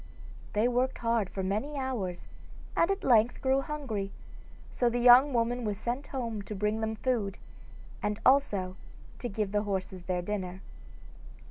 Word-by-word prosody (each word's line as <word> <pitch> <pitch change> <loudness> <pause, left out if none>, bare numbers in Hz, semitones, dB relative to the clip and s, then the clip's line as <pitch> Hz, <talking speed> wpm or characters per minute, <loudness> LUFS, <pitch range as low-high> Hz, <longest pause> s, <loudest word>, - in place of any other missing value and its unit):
They 215 +2 +3
worked 250 +2 +1
hard 230 -4 0
for 190 - -4
many 215 +10 -2
hours, 220 -10 -3 0.5
and 335 - +3
at 395 0 -1
length 235 -1 +4
grew 265 +1 +2
hungry, 265 -10 -4 0.6
so 245 - +2
the 240 - -1
young 250 +4 +7
woman 240 0 0
was 210 -2 -2
sent 245 +6 -3
home 230 -6 -3
to 210 +1 -7
bring 210 +2 0
them 220 0 -1
food, 220 -5 -1 0.6
and 210 0 -1
also 200 -9 +3 0.4
to 245 - -3
give 205 -1 -2
the 205 0 +2
horses 190 -2 -3
their 180 -1 -1
dinner. 185 -1 -4
220 Hz, 155 wpm, -30 LUFS, 200-250 Hz, 0.6 s, young